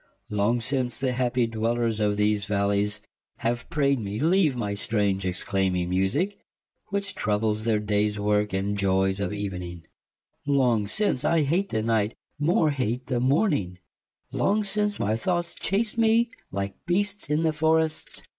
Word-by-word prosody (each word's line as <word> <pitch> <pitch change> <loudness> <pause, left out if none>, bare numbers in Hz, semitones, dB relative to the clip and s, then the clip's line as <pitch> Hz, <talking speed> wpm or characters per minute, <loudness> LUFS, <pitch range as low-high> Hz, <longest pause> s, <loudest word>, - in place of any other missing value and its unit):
Long 105 +4 +1
since 125 0 0
the 130 -1 0
happie 125 -1 +1
dwellers 115 0 -1
of 105 -1 +1
these 105 -1 +1
vallies, 100 +1 0 0.3
Have 120 0 -2
praide 140 -5 +1
me 105 0 -4
leave 165 -2 +3
my 105 -4 -2
strange 100 -2 0
exclaiming 90 -1 0
musique, 140 - 0 0.5
Which 200 0 -1
troubles 110 0 -1
their 115 -2 +2
dayes 105 0 0
worke, 105 0 +1
and 95 +2 -1
joyes 95 -1 +1
of 100 -3 -2
evening: 90 -4 -5 0.6
Long 125 -7 +2
since 145 - 0
I 160 0 +3
hate 175 +8 0
the 110 -1 -1
night, 110 -1 +1 0.2
more 155 0 +3
hate 125 -2 -2
the 125 -3 -1
morning: 130 - +1 0.5
Long 210 +2 +1
since 210 0 0
my 105 +2 +1
thoughts 175 +7 -1
chase 215 +4 -1
me 230 +1 +3 0.2
like 100 0 -4
beasts 200 -1 0
in 160 +2 +2
for 160 +1 +2
rests. 160 -1 -2
115 Hz, 150 wpm, -26 LUFS, 100-155 Hz, 0.6 s, leave